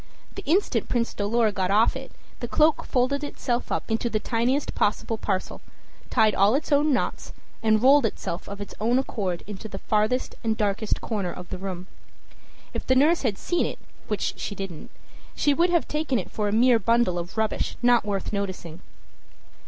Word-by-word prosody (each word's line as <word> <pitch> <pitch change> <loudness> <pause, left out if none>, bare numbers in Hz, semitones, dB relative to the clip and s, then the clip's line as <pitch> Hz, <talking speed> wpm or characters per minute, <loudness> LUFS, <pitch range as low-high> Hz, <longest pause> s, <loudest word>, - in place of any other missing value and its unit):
The - - -7
instant 365 +7 +1
Prince 235 -1 0
Dolor 215 +2 +1
got 190 -2 -1
off 215 +3 +4
it, - - -7 0.3
the 240 - -4
cloak 305 +5 +3
folded 270 +3 0
itself 250 -4 -3
up - - -2
into 225 +2 0
the 215 - 0
tiniest 240 +6 0
possible 220 +1 0
parcel, 190 -2 -2 0.5
tied 215 -1 +4
all 200 +5 +4
its 300 - -2
own 295 +1 +4
knots, 260 - -2 0.3
and 220 0 +3
rolled 275 -2 +6
itself 175 -4 -5
of 200 0 -7
its 205 - -7
own 235 +3 +3
accord 195 -9 -2
into 210 +1 -7
the 195 -2 -7
farthest 215 +5 0
and 220 -1 0
darkest 210 0 -1
corner 200 -6 -2
of 180 0 -9
the 185 - -5
room. 185 -2 -5 0.9
If - - -5
the 260 - +4
nurse 310 +6 +4
had 220 -7 0
seen 350 - 0
it, - - -6 0.3
which - - -1
she 200 - -4
didn't, 190 -5 -7 0.5
she 290 - +3
would 340 +5 +3
have 345 -2 +2
taken 300 -4 0
it 190 - -4
for 210 -1 -1
a - - 0
mere 235 +2 +5
bundle 230 -4 +2
of 175 +5 -7
rubbish 220 -1 -1
not 245 -1 +5
worth 205 0 -3
noticing. 185 -5 -4
220 Hz, 185 wpm, -25 LUFS, 200-255 Hz, 0.9 s, rolled